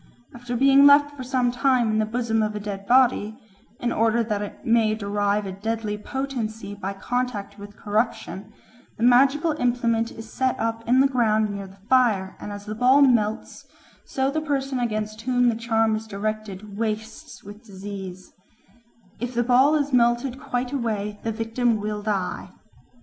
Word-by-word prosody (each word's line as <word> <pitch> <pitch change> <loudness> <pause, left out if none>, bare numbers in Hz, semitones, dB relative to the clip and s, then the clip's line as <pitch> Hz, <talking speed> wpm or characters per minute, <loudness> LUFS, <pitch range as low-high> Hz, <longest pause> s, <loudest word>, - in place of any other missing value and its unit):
After 245 0 -5
being 275 +2 +6
left 290 0 +5
for 275 - -8
some 250 -1 0
time 250 -3 +2
in 215 - +1
the 215 - 0
bosom 225 -1 0
of 215 0 -1
a - - -3
dead 200 -1 -6
body, 240 -4 +3 0.4
in 240 - -1
order 230 +1 +2
that 210 -2 -2
it 205 - -8
may 225 -2 +3
derive 205 0 -1
a 190 - -4
deadly 215 +2 -3
potency 225 -3 -5
by 200 -1 -5
contact 205 -1 -3
with 205 +1 -11
corruption, 210 -2 -2 0.5
the 225 - -3
magical 275 +6 +4
implement 235 -2 0
is 225 -1 -11
set 260 -1 0
up 225 0 -2
in 255 +2 +5
the 275 - +5
ground 220 -5 +1
near 200 -1 -6
the 190 +1 -16
fire, 220 -8 +2
and 205 - -7
as 205 0 -8
the 215 - -5
ball 255 +5 +5
melts, 225 -5 0 0.4
so 265 0 -1
the 310 +2 -1
person 275 -3 -2
against 215 -2 -3
whom 245 0 +2
the 230 - 0
charm 225 -1 +1
is 220 +1 -6
directed 210 -1 -5
wastes 220 0 -5
with 205 +3 -12
disease; 190 -3 -9 0.9
if 245 +1 -4
the 240 - +2
ball 260 +5 +4
is 290 -2 -1
melted 240 +2 +2
quite 245 0 -3
away, 210 -5 -2
the 225 - -2
victim 225 +1 0
will 210 0 -3
die. 200 -3 -3
225 Hz, 170 wpm, -24 LUFS, 210-250 Hz, 0.9 s, being